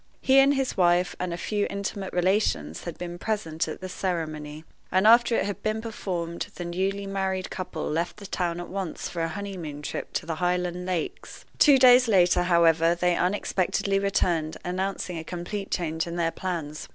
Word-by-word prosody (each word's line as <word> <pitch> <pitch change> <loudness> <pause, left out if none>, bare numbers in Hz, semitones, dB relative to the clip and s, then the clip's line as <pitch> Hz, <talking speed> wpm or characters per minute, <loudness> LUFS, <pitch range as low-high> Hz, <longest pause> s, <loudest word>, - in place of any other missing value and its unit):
He 270 +1 +5
and 275 +1 +5
his 270 -1 -1
wife, 175 -1 +3
and 180 -1 -2
a 170 - -3
few 205 +2 -1
intimate 200 -1 -4
relations 180 - 0
had 170 - -6
been 175 0 -6
present 165 -7 -2
at 155 - -6
the 185 - -4
ceremony; 155 -5 -4 0.3
and 185 +2 +3
after 235 +1 +6
it - - +1
had 205 0 -4
been 215 +1 -1
performed 180 -7 -4
the 175 - -5
newly 190 +3 -2
married 190 -1 -2
couple 180 -4 -4
left 170 +5 -2
the 205 - -10
town 175 -2 -2
at 175 - -6
once 190 -4 -4
for 170 - -4
a 165 - +1
honeymoon 170 -5 -6
trip - - -5
to - - -2
the 165 -1 -3
Highland 180 0 -1
lakes. 180 -4 -4
Two 285 -3 +7
days 250 -1 +7
later, 180 -4 +4
however, 170 -1 +4
they 175 0 +1
unexpectedly 195 +1 0
returned, 175 -5 0
announcing 185 -1 -2
a - - -6
complete 180 +4 -5
change 160 -1 -1
in 170 - -5
their 170 -1 0
plans. 165 -5 -4
180 Hz, 185 wpm, -26 LUFS, 170-200 Hz, 0.3 s, Two